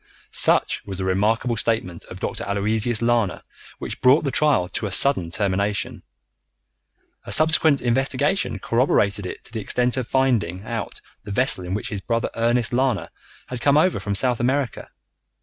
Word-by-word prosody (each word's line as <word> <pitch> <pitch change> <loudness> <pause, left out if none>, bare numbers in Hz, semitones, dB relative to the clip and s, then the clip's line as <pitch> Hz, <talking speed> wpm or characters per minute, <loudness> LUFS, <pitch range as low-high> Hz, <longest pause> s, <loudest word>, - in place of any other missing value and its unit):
Such - - +2
was 100 -2 -7
the 95 - -3
remarkable 110 +6 0
statement 110 -7 -2
of - - -10
Dr. - - -4
Aloysius 110 +3 +1
Lana 115 -5 0 0.3
which - - -6
brought 130 +5 +5
the 140 - -1
trial 145 -13 +2
to 105 - -3
a - - -6
sudden 95 -5 +3
termination. 100 +2 -2 1.2
A - - -9
subsequent 155 -3 +3
investigation 135 - 0
corroborated 105 -3 +1
it - - -8
to - - -11
the 110 - -3
extent 125 +5 0
of 125 -3 -2
finding 110 -9 0
out 115 -2 -5 0.2
the 105 - -10
vessel 125 -3 +1
in 90 +2 -3
which 115 +4 -4
his 105 -5 -4
brother 115 +2 -2
Ernest 120 +1 0
Lana 120 -9 0 0.3
had 125 -2 -7
come 140 +2 +3
over 180 +4 +2
from 100 -1 -3
South 125 +2 +2
America. 130 0 -1
115 Hz, 165 wpm, -22 LUFS, 100-130 Hz, 1.2 s, brought